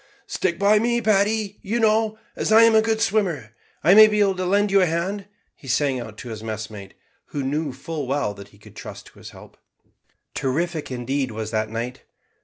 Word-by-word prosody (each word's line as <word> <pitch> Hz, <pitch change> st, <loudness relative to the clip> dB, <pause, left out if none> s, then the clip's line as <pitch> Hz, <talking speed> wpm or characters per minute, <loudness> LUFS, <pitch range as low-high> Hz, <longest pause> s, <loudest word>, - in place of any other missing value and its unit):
"Stick 170 Hz, -3 st, -2 dB
by 205 Hz, +2 st, +4 dB
me, 235 Hz, +2 st, +1 dB
Paddy, 210 Hz, -1 st, +1 dB
you 225 Hz, +5 st, -2 dB
know; 220 Hz, 0 st, +2 dB, 0.2 s
as -, -, -2 dB
I'm 225 Hz, +1 st, +7 dB
a 220 Hz, -, +6 dB
good 220 Hz, 0 st, 0 dB
swimmer 185 Hz, -, 0 dB, 0.3 s
I 170 Hz, +5 st, +6 dB
may 215 Hz, +1 st, +9 dB
be 210 Hz, 0 st, 0 dB
able 200 Hz, -2 st, +3 dB
to 185 Hz, -1 st, -2 dB
lend 205 Hz, +2 st, +2 dB
you 195 Hz, 0 st, +5 dB
a 180 Hz, -, +3 dB
hand," 190 Hz, +5 st, -2 dB, 0.3 s
he 135 Hz, -, -15 dB
sang 135 Hz, +1 st, +1 dB
out 110 Hz, -3 st, -9 dB
to 120 Hz, -, -8 dB
his 110 Hz, -2 st, -7 dB
messmate, 110 Hz, -3 st, -7 dB, 0.3 s
who 145 Hz, -, -4 dB
knew 145 Hz, +2 st, -2 dB
full 145 Hz, +2 st, -6 dB
well 135 Hz, -6 st, -1 dB
that 100 Hz, -1 st, -12 dB
he 100 Hz, -, -22 dB
could 105 Hz, -, -17 dB
trust -, -, -9 dB
to -, -, -17 dB
his -, -, -10 dB
help. -, -, -15 dB, 0.8 s
Terrific, 160 Hz, +4 st, -2 dB
indeed, 130 Hz, +2 st, -2 dB
was 110 Hz, -1 st, -5 dB
that 110 Hz, -1 st, -1 dB
night. 120 Hz, +3 st, -5 dB
165 Hz, 205 wpm, -23 LUFS, -, 0.8 s, may